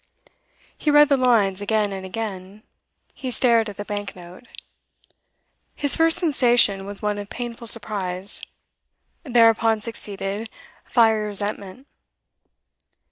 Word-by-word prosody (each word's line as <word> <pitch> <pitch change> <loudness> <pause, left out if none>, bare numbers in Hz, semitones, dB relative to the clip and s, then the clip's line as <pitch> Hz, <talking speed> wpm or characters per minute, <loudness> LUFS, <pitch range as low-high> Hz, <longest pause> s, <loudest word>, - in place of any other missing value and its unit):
He 305 - -2
read 295 0 +6
the 280 - +4
lines 220 -7 +2
again 210 -1 0
and 190 -1 -7
again; 195 0 -7 0.5
he 260 - -6
stared 230 -2 +2
at 200 - -10
the 205 - -6
bank 205 -1 -5
note. 180 +6 -14 1.3
His 285 -2 +1
first 325 0 +4
sensation 240 - +3
was 205 0 -6
one 210 0 -1
of 205 0 -8
painful 235 -1 -7
surprise; 200 -4 -1 0.8
thereupon 230 -4 +3
succeeded 210 -1 -5 0.4
fiery 220 -3 +2
resentment. 205 +3 -5
215 Hz, 115 wpm, -22 LUFS, 200-240 Hz, 1.3 s, read